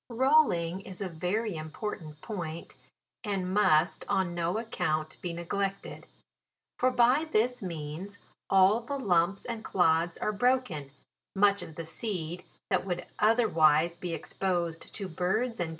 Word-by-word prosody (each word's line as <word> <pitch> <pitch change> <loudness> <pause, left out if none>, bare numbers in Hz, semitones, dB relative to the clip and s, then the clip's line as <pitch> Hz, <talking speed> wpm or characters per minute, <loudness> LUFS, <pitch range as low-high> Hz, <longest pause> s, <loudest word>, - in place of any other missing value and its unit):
Rolling 235 - +3
is 190 -1 -10
a 200 - -2
very 180 +5 -2
important 155 0 -6
point, 170 -6 -6 0.5
and 190 -4 -2
must 175 -5 +3
on 185 -2 +1
no 175 +3 -1
account 155 -9 -2
be 175 - -3
neglected; 195 +4 -4 0.7
for 255 - +4
by 255 +5 +3
this 245 +3 +1
means 170 +2 -6 0.3
all 195 +4 +5
the 280 +4 -4
lumps 190 -5 +1
and 230 -2 -5
clods 165 -1 +2
are - - -1
bro 250 +5 +3
ken, 155 - -8 0.5
much 200 0 +4
of 160 - -9
the 165 - -6
seed 175 -1 -4 0.3
that - - +2
would 180 -2 -3
otherwise 170 -8 +4
be 175 0 -5
exposed 170 -1 -2
to 200 - -5
birds, 190 +8 -1
ccc. 175 -2 -1
185 Hz, 140 wpm, -29 LUFS, 165-215 Hz, 0.7 s, all